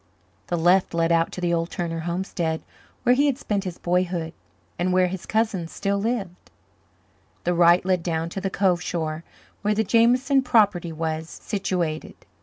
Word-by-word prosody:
The 175 - -1
left 175 +1 +3
led 165 0 +2
out 165 0 +2
to 180 - -6
the 175 -1 +1
old 165 0 0
Turner 165 -1 -3
homestead, 170 -1 -2 0.4
where 245 - +5
he 285 +3 +3
had 275 -3 +1
spent 205 -7 -2
his 180 -2 -5
boyhood 175 -2 -1 0.5
and 180 +1 +1
where 185 0 +4
his 180 0 -5
cousin 215 -6 0
still 200 +4 -2
lived; 200 -5 -3 0.9
the 175 - +1
right 175 +1 +5
led 185 -2 +2
down 165 -1 -2
to 195 - -5
the 195 - -1
Cove 185 -2 +1
shore 160 -2 -3 0.4
where 210 0 +1
the 220 - +2
Jameson 250 +5 +3
property 205 -9 +2
was 160 0 -3
situated. 175 -7 -3
180 Hz, 170 wpm, -24 LUFS, 170-200 Hz, 0.9 s, where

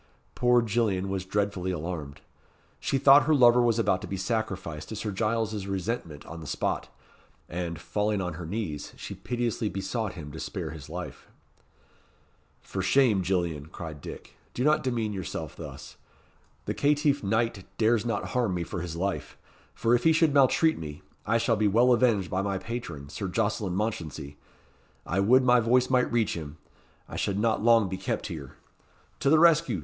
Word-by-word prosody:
Poor 120 -1 +3
Gillian 105 -4 0
was 95 -1 -3
dreadfully 100 -2 -1
alarmed. 80 -4 -5 0.6
She 135 - 0
thought 140 +2 +7
her 155 - +5
lover 125 -2 +6
was 120 -2 +2
about 95 -5 +1
to - - -6
be 95 - -4
sacrificed 95 -7 -3
to 110 - -5
Sir 105 0 -3
Giles's 110 0 -1
resentment 95 -6 -3
on 85 - -8
the 80 - -8
spot; - - -2 0.6
and, 85 -1 -4
falling 105 +5 -1
on 90 -3 -3
her 85 +1 -7
knees, 85 -6 -4
she - - -7
piteously 120 -3 -2
besought 100 +2 -3
him 75 -5 -8
to 80 - -8
spare - - -4
his 80 -4 -10
life. - - -7 1.4
"For 95 - -4
shame, 105 0 +3
Gillian," 85 -5 -1
cried 80 -3 -8
Dick; - - -9 0.2
"do 125 - -1
not 150 +2 +4
demean 115 -5 -1
yourself 95 -3 -5
thus. - - -9 0.7
The - - -2
caitiff 145 -1 +2
knight 110 -1 0
dares 115 -1 +3
not 115 -4 -2
harm 120 -7 0
me 85 - -1
for 85 +1 -5
his 85 -2 -5
life; 95 +3 -3 0.5
and 115 - +4
if 120 0 +3
he 160 - +5
should 160 -2 +3
maltreat 145 +4 +4
me, 75 -2 -8 0.2
I 115 - +3
shall 115 0 +2
be 105 0 +2
well 120 +5 +5
avenged 115 -7 +2
by 95 - 0
my 100 -1 -1
patron, 95 -9 -6
Sir 100 +5 -4
Jocelyn 105 -1 -1
Mounchensey. 80 -9 -3 0.7
I 90 - -1
would 125 +7 +5
my 125 -1 +5
voice 125 +3 +2
might 125 -1 +3
reach 115 -4 +1
him 75 -2 -7 0.5
I - - -7
should 100 - -1
not 110 0 +1
long 115 -2 +5
be 95 0 -4
kept - - -3
here. 70 -5 -9 0.6
To 140 - +2
the 160 - +6
rescue! 165 - +4
105 Hz, 175 wpm, -27 LUFS, 90-120 Hz, 1.4 s, thought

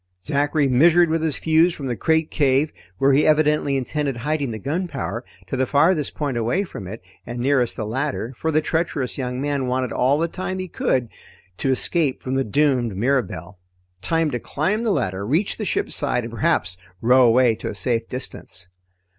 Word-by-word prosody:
Zachary 145 +1 +1
measured 165 +6 +5
with 165 0 +1
his 160 -3 0
fuse 165 +2 +3
from 140 - -7
the 125 -2 -2
crate 160 +7 +1
cave, 140 +1 +2 0.2
where 135 0 +3
he 145 +3 +4
evidently 150 -2 +3
intended 140 0 -2
hiding 145 +2 -1
the 110 - -4
gunpowder, 140 - -3 0.2
to 95 - -4
the 130 0 0
farthest 150 +2 +2
point 140 -5 -2
away 120 - 0
from 100 - -8
it 105 +1 -8 0.2
and 120 - -7
nearest 125 -1 +1
the 110 - -4
ladder, 130 +1 -3
for 160 - -2
the 155 0 +3
treacherous 155 -5 -1
young 125 -1 -3
man 140 -2 -1
wanted 125 -1 -1
all 135 +3 +2
the 165 +2 +1
time 185 +2 -4
he 185 0 -4
could 130 -7 0
get - - -29 0.5
to 135 - 0
escape 135 +2 +1
from 130 - -3
the 135 0 +1
doomed 125 -4 +1
Mirabelle. 100 -7 -1 0.4
Time 165 - +1
to 120 - -2
climb 190 - -1
the 235 - 0
ladder, 95 - -1
reach 155 - 0
the 215 - -3
ship's - - -1
side, 130 -4 0
and 115 0 -7
perhaps 105 - 0 0.2
row 125 +3 +5
away 120 0 +5
to - - -5
a - - -6
safe 115 +4 -1
distance. 95 -7 -7
135 Hz, 195 wpm, -22 LUFS, 120-155 Hz, 0.5 s, measured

